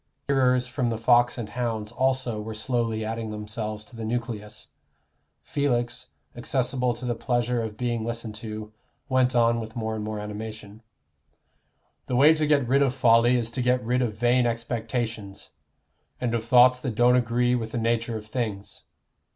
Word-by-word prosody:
Hearers 130 -2 +3
from 125 -1 -1
the 115 - -2
Fox 120 +2 +3
and 115 -3 -5
Hounds 110 -2 -3
also 130 -3 0
were 110 +1 -6
slowly 115 -1 -1
adding 115 0 -4
themselves 105 0 -5
to 115 - -15
the 115 - -6
nucleus. 110 -2 -4 0.7
Felix, 120 -4 -1 0.3
accessible 125 0 0
to 125 +2 -7
the 120 - 0
pleasure 120 0 0
of 110 -1 -5
being 120 -2 -1
listened 115 -1 -4
to, 110 0 -7 0.4
went 130 -1 +2
on 115 0 +3
with 110 +1 -7
more 110 -2 -2
and 110 -1 -4
more 110 0 -4
animation: 105 0 -7 1.3
"The 125 - -1
way 145 +5 +7
to 155 -1 0
get 140 -4 +3
rid 135 +3 +3
of 135 -2 +2
folly 120 -1 +5
is 115 -2 -1
to 130 - -3
get 125 0 +1
rid 125 +2 +1
of 115 -4 -1
vain 120 +2 +3
expectations, 115 -3 -3 0.7
and 120 -2 -1
of 115 -1 -1
thoughts 125 +2 +6
that 125 -3 -4
don't 120 +2 +5
agree 120 0 +2
with 115 -2 -2
the - - -3
nature 115 0 0
of 105 - -9
things. 110 -3 -4
120 Hz, 170 wpm, -26 LUFS, 110-125 Hz, 1.3 s, way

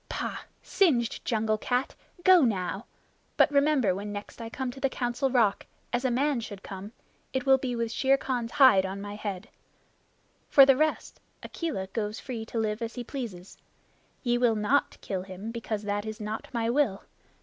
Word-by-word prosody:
"Pah! - - -3 0.2
Singed 255 - +1
jungle 215 -2 0
cat 250 +3 -1 0.3
go 370 -2 +7
now! 195 -3 -1 0.5
But - - +5
remember 280 -8 +3
when 205 +2 -5
next 205 +3 -7
I 225 - -5
come 260 +1 -4
to 270 - -11
the 270 - +1
Council 250 +1 -1
Rock, 230 -6 +2 0.3
as 245 +1 0
a 260 - +2
man 270 +2 +1
should 205 -4 -8
come, 195 +2 -8 0.4
it 260 -1 -1
will 265 -1 +5
be 255 -2 -2
with 230 -1 -2
Shere 270 +2 +3
Khan's 245 -4 -3
hide 260 -10 +7
on 190 +1 -4
my 205 0 -6
head. 200 -3 -5 1.0
For 275 - +8
the 270 -1 +6
rest, 310 +3 -1 0.2
Akela 305 - -3
goes 210 +2 -4
free 230 -4 -6
to 230 - -5
live 215 0 -1
as 230 0 -4
he 245 - -4
pleases. 220 -9 -7 0.6
Ye 240 -2 +1
will 240 -2 +3
not 215 +7 +1
kill 190 -3 -3
him, 190 +4 -7
because 225 -2 -4
that 205 +1 -2
is 215 0 -6
not 215 +1 -5
my 230 -2 -1
will. 235 -6 +1
230 Hz, 180 wpm, -28 LUFS, 205-265 Hz, 1.0 s, For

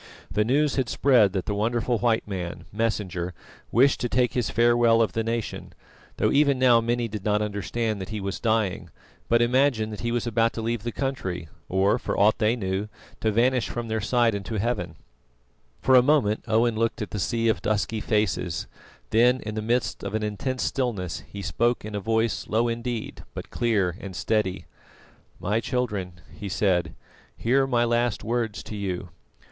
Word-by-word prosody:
The 105 +2 +2
news 140 +6 +1
had 130 -4 0
spread 120 -8 +4
that 95 -3 -2
the 105 - -1
wonderful 115 +3 0
white 115 -2 +1
man, 90 -4 -5
Messenger, 95 -5 -2 0.4
wished 130 +4 +4
to 120 - -1
take 125 0 +2
his 125 -3 0
farewell 120 -1 +4
of 110 -5 +2
the 115 - 0
nation, 115 0 -4 0.4
though - - +2
even 140 -1 +4
now 125 -2 +5
many 120 +1 0
did 105 -2 -6
not 105 0 +2
understand 105 +1 -2
that 95 - -6
he 110 -1 -4
was 100 -1 -4
dying, 110 -5 0 0.4
but 115 0 +4
imagined 120 -3 +2
that 105 - -7
he 120 - -2
was 120 0 -1
about 115 -1 +1
to 115 - -4
leave 115 -1 -1
the 120 +2 -3
country, 110 - -3 0.2
or, 95 +2 +2
for - - -2
aught 105 +2 +4
they 110 +2 +3
knew, 95 -1 -2 0.3
to 110 - +1
vanish 125 +3 +2
from 120 -1 -4
their 110 0 -1
sight 120 +1 +2
into 100 +2 -4
Heaven. 95 -7 -2 0.9
For 130 - +4
a 125 - +9
moment 125 -6 +2
Owen 115 +1 +2
looked 115 -1 0
at - - -8
the 105 - -3
sea 115 +4 0
of 110 - +1
dusky 110 +1 -1
faces, 105 -7 0 0.5
then 125 +3 +4
in 105 - -5
the 110 - -2
midst 120 +3 -1
of - - -3
an 110 - -1
intense 125 +5 -2
stillness, 110 -10 -2
he 100 -1 -6
spoke 120 +8 0
in 110 - -6
a 105 - -1
voice 110 +2 0
low 115 +2 +2
indeed 115 -1 -4
but - - -7
clear 100 -7 +1
and 95 -2 -8
steady: 105 -3 -1 0.7
"My 105 +4 0
children," 110 -7 -2 0.2
he 100 +4 -6
said, 90 -1 +1 0.4
"hear 135 +3 +2
my 120 -2 +2
last 120 -1 0
words 115 -2 -2
to 105 - -7
you. 95 -3 -4
110 Hz, 185 wpm, -25 LUFS, 105-120 Hz, 0.9 s, a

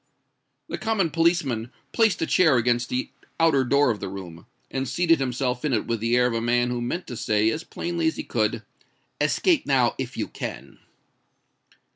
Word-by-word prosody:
The - - -5
common 215 -7 0
policeman 160 -9 +1 0.2
placed 225 -7 +2
a - - +1
chair 160 -6 +4
against 120 +1 +1
the 125 +1 -2 0.3
outer 160 -5 +4
door 140 +1 +3
of 105 - -4
the 100 - -5
room, 90 -4 -9 0.2
and 135 -1 -2
seated 165 +3 +3
himself 125 -1 -2
in 150 -3 0
it 110 - 0
with 115 -1 -2
the 115 +2 +1
air 125 - +4
of 125 - 0
a 115 - -1
man 120 +1 +1
who 120 -1 -2
meant 170 +10 -3
to 125 - -7
say 110 0 +1
as 160 - -4
plainly 170 -1 -2
as 160 - 0
he - - -5
could, 110 0 -1 0.6
"Escape 340 -6 +2
now 130 -4 +3
if 130 -1 -5
you - - -2
can." - - -7
125 Hz, 190 wpm, -24 LUFS, 115-160 Hz, 0.6 s, chair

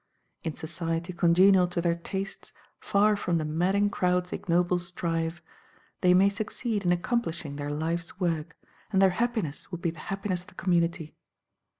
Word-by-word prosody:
In 160 - -3
society 165 +2 -3
congenial 180 +2 +5
to 175 0 -3
their 170 0 +2
tastes, 190 +3 -5 0.3
far 210 +1 +3
from 180 -4 0
"the 155 - -1
madding 190 +6 +1
crowd's 180 -1 0
ignoble 175 0 +1
strife," 170 -1 -3 0.6
they 180 0 +5
may 190 +2 +6
succeed 210 +1 -2
in 175 - +2
accomplishing 175 - -1
their 145 0 -4
life's 165 +4 -3
work, 165 -3 -1 0.3
and 190 - +3
their 190 -1 +6
happiness 220 - -2
would 175 -2 -6
be 170 - +1
the 165 - -13
happiness 195 0 -3
of 180 - -18
the 205 - -17
community. 170 -3 0
175 Hz, 160 wpm, -28 LUFS, 165-195 Hz, 0.6 s, may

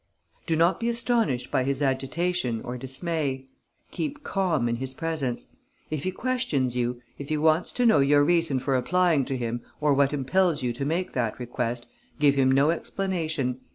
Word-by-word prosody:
"Do 165 - +2
not 170 +3 +3
be 235 - 0
astonished 235 - 0
by 130 - +2
his 135 +1 -1
agitation 135 -1 -1
or 125 - -5
dismay. 135 +1 -3 0.5
Keep 295 -1 -4
calm 175 -11 0
in 120 0 -1
his 130 +1 -4
presence. 155 -7 -3 0.5
If 155 0 -3
he 185 - 0
questions 185 - -1
you, 120 0 -1 0.2
if 140 - -7
he 155 - +1
wants 160 +3 +2
to 245 - +1
know 220 -10 +6
your 145 +1 +5
reason 165 -3 +2
for 130 +1 0
applying 165 +2 +2
to 135 - -2
him 120 0 -3 0.2
or 150 -1 +3
what 140 0 +3
impels 150 +3 +1
you 120 -1 0
to 140 +4 -4
make 175 +5 -1
that 115 -4 -1
request, 120 -1 -3 0.3
give 145 -2 +4
him 135 -1 +3
no 140 +4 +4
explanation. 160 -8 -2
145 Hz, 180 wpm, -26 LUFS, 130-170 Hz, 0.5 s, know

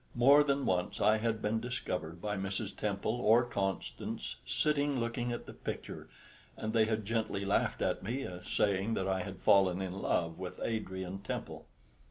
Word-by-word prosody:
More 140 +5 +7
than 140 -1 +1
once 90 -1 0
I 110 +1 +5
had 110 -1 -1
been 110 +2 +1
discovered 110 -9 -3
by 105 -1 -1
Mrs. 100 +2 -3
Temple 105 +3 -1
or 115 +2 +6
Constance 95 - -3
sitting 145 -3 +1
looking 120 +1 -1
at 120 - -4
the - - -9
picture, - - -6 0.5
and 110 0 -3
they 110 -1 +5
had 110 -1 -1
gently 110 -3 -1
laughed 100 - +1
at - - 0
me, 130 +4 -3
saying 100 +4 +1
that 95 - -1
I 95 -1 +1
had 95 -2 -7
fallen 95 -2 +5
in 95 -1 -3
love 85 0 0
with 90 -1 -6
Adrian 95 -4 -3
Temple. - - -5
105 Hz, 170 wpm, -33 LUFS, 95-120 Hz, 0.5 s, More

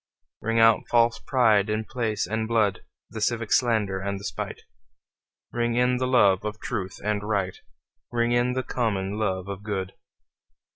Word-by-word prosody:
Ring 115 +1 0
out 115 -1 +6
false 115 -1 +3
pride 110 -5 +3
in 110 +1 -1
place 110 -4 -2
and 110 0 -2
blood, 110 -5 +2 0.3
The 110 - -6
civic 115 0 0
slander 110 -6 +2
and 100 0 -3
the - - -12
spite; - - -5 0.9
Ring 120 0 0
in 125 +1 +2
the 130 0 -1
love 100 -7 +4
of 105 0 -4
truth 95 -6 -4
and 105 0 0
right, 100 -3 -1 0.5
Ring 120 0 +1
in 120 +1 +2
the 130 0 -1
common 105 -5 -2
love 95 -3 -1
of 100 -1 -6
good. 95 -2 -4
110 Hz, 160 wpm, -25 LUFS, 100-120 Hz, 0.9 s, out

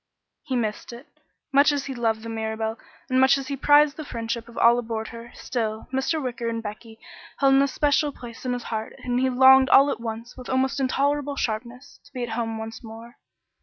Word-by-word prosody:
He 260 - -4
missed 220 -2 -3
it. 240 +4 -11 0.5
Much 280 +2 +5
as 285 -2 -2
he 270 - -5
loved 225 -3 -1
the 230 - -6
Mirabelle, 220 0 -3 0.3
and 260 0 +2
much 265 +1 +5
as 270 0 -6
he 280 - -2
prized 290 +1 +4
the 310 - -5
friendship 230 -3 -5
of 235 - -14
all 235 +1 +5
aboard 225 -2 -4
her, 235 0 -10
still, 220 -3 -4
Mr. 270 +5 0
Wicker 250 -4 -3
and 230 0 -4
Becky 220 +1 -8 0.4
held 275 -1 +4
an 270 - +5
especial 290 +1 +1
place 240 -4 -11
in 250 -1 -1
his 245 -1 -4
heart 220 -1 -5
and 245 0 0
he 260 0 +2
longed 265 +1 +6
all 280 +1 +6
at - - -4
once, 230 +1 -6
with 255 -1 -10
almost 260 +1 0
intolerable 285 +2 0
sharpness, 240 +3 -5
to 285 - -21
be 250 -2 -4
at 240 - -4
home 225 0 -3
once 225 +1 -7
more. 230 +1 -11
245 Hz, 210 wpm, -24 LUFS, 225-270 Hz, 0.5 s, longed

